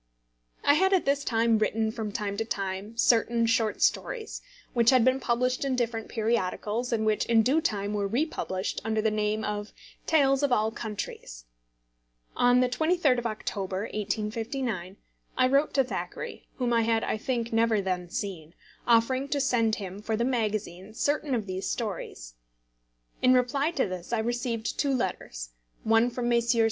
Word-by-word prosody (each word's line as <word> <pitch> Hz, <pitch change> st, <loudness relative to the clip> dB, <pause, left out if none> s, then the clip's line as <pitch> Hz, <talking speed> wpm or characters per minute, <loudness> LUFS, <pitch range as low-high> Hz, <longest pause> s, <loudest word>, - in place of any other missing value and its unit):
I 285 Hz, -, +5 dB
had 380 Hz, +6 st, +3 dB
at 375 Hz, -, +3 dB
this 280 Hz, 0 st, +1 dB
time 230 Hz, -2 st, +2 dB
written 220 Hz, 0 st, +1 dB
from 220 Hz, -2 st, -4 dB
time 200 Hz, 0 st, -3 dB
to 225 Hz, -, 0 dB
time 200 Hz, +1 st, -4 dB
certain 230 Hz, 0 st, +3 dB
short 225 Hz, -1 st, +1 dB
stories, 450 Hz, -3 st, -1 dB, 0.3 s
which 235 Hz, -2 st, +4 dB
had 255 Hz, -3 st, +5 dB
been 260 Hz, +1 st, +3 dB
published 250 Hz, +1 st, 0 dB
in 270 Hz, -2 st, 0 dB
different 230 Hz, -2 st, -2 dB
periodicals, 225 Hz, +1 st, -1 dB
and 220 Hz, -2 st, 0 dB
which 215 Hz, -1 st, +2 dB
in 230 Hz, -1 st, +4 dB
due 285 Hz, +8 st, +3 dB
time 205 Hz, -8 st, -1 dB
were 205 Hz, -1 st, 0 dB
republished 215 Hz, -, -2 dB
under 220 Hz, -1 st, 0 dB
the 220 Hz, 0 st, +2 dB
name 215 Hz, 0 st, 0 dB
of 210 Hz, 0 st, -4 dB, 0.3 s
Tales 275 Hz, -3 st, +3 dB
of 285 Hz, -2 st, +1 dB
All 220 Hz, -2 st, +2 dB
Countries. 205 Hz, -, -6 dB, 0.9 s
On 245 Hz, +1 st, +4 dB
the 255 Hz, -, +3 dB
23d 315 Hz, -1 st, +2 dB
of 240 Hz, -, -2 dB
October, 195 Hz, -3 st, -3 dB
1859, 215 Hz, -1 st, -3 dB, 0.4 s
I 255 Hz, -, +5 dB
wrote 280 Hz, +3 st, +2 dB
to 270 Hz, -, +5 dB
Thackeray, 255 Hz, -, -6 dB
whom 245 Hz, -2 st, 0 dB
I 230 Hz, -, +4 dB
had, 225 Hz, 0 st, +1 dB
I -, -, -1 dB
think, 235 Hz, 0 st, -2 dB
never 225 Hz, -1 st, +3 dB
then 180 Hz, -2 st, -2 dB
seen, 170 Hz, -4 st, -5 dB, 0.3 s
offering 245 Hz, +3 st, +3 dB
to 285 Hz, 0 st, -1 dB
send 235 Hz, -5 st, +2 dB
him 195 Hz, 0 st, -7 dB
for 220 Hz, +1 st, -1 dB
the 235 Hz, -, +1 dB
magazine 215 Hz, -5 st, -2 dB
certain 290 Hz, 0 st, 0 dB
of 220 Hz, -4 st, -2 dB
these 185 Hz, 0 st, -3 dB
stories. 195 Hz, -, -5 dB, 0.9 s
In 255 Hz, 0 st, +5 dB
reply 275 Hz, +4 st, +2 dB
to 280 Hz, -9 st, 0 dB
this 185 Hz, +1 st, -7 dB
I 235 Hz, -, +1 dB
received 235 Hz, 0 st, -2 dB
two 280 Hz, -2 st, +2 dB
letters, -, -, -3 dB, 0.3 s
one 225 Hz, +2 st, +4 dB
from 240 Hz, 0 st, -3 dB
Messrs. 235 Hz, 0 st, +2 dB
230 Hz, 170 wpm, -28 LUFS, 210-255 Hz, 0.9 s, I